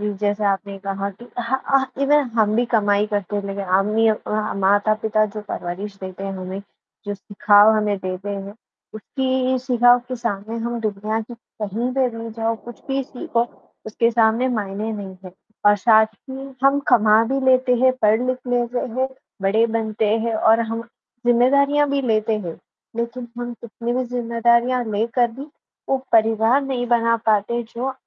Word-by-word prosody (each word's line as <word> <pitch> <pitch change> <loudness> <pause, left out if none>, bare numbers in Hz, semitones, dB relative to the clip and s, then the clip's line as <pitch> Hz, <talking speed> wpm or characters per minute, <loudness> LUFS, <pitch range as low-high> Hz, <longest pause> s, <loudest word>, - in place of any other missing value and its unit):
जी, 210 0 -1
जैसे 205 0 0
आपने 195 0 -2
कहा 195 0 -2
कि 200 +5 -14
हाँ, 245 +3 -1
हाँ, 270 -1 +2
इवन 285 -2 +3
हम 215 -1 +3
भी 240 - +3
कमाई 205 -3 +2
करते 205 -1 -3
हैं 205 - -2
लेकिन 200 0 -4
हम 190 +2 +2
नहीं 220 +1 +3
अ, 215 0 -2
माता-पिता 215 +2 +2
जो 215 - -4
परवरिश 195 +4 -5
देते 190 0 -7
हैं 195 - -3
हमें, 185 +1 -6 0.5
जो 205 - -2
सिखाव 205 +1 +4
हमें 210 -1 0
देते 185 +1 -5
हैं, 200 0 -5 0.4
उसकी 260 +3 -1
सिखाव 245 -1 +4
के 255 - -3
सामने 225 -1 -4
हम 235 0 -2
दुनिया 215 +1 -2
की 230 +2 -9
कहीं 230 +1 -5
पे 265 -2 +2
भी 230 0 -6
जाओ, 225 0 -1
कुछ 240 -1 -11
भी 270 0 0
सीखो, 240 -2 -2 0.4
उसके 230 +2 +1
सामने 230 +2 +2
मायने 215 -2 -3
नहीं 195 -3 -7
है। 185 - -10 0.3
और 205 0 +6
साथ 220 +1 +5 0.2
ही 270 +1 -7 0.2
हम 275 +1 +5
कमा 220 -2 +5
भी 270 - 0
लेते 255 -1 +4
हैं, 260 0 +5
पढ़-लिख 245 +4 +2
लेते 245 0 0 0.2
हैं, 260 +1 0 0.3
बड़े 215 +4 +3
बनते 220 -1 -1 0.2
हैं 230 -1 -1
और 220 +1 +4
हम 230 0 -3 0.4
ज़िम्मेदारियाँ 280 +4 +4
भी 280 0 +1
लेते 220 -2 +1
हैं। 175 -5 -7 0.4
लेकिन 235 +1 -4
हम 240 0 -4
कितनी 235 +1 -5
भी 255 +1 0
ज़िम्मेदारियाँ 235 +1 +1
लेकर 230 +3 +1
भी 265 +4 -8 0.5
वो 270 - +2 0.2
परिवार 225 +3 +4
नहीं 260 -3 -2
बना 230 -1 +2
पाते, 220 +2 +1
जो 240 +3 -4
225 Hz, 170 wpm, -21 LUFS, 205-245 Hz, 0.5 s, और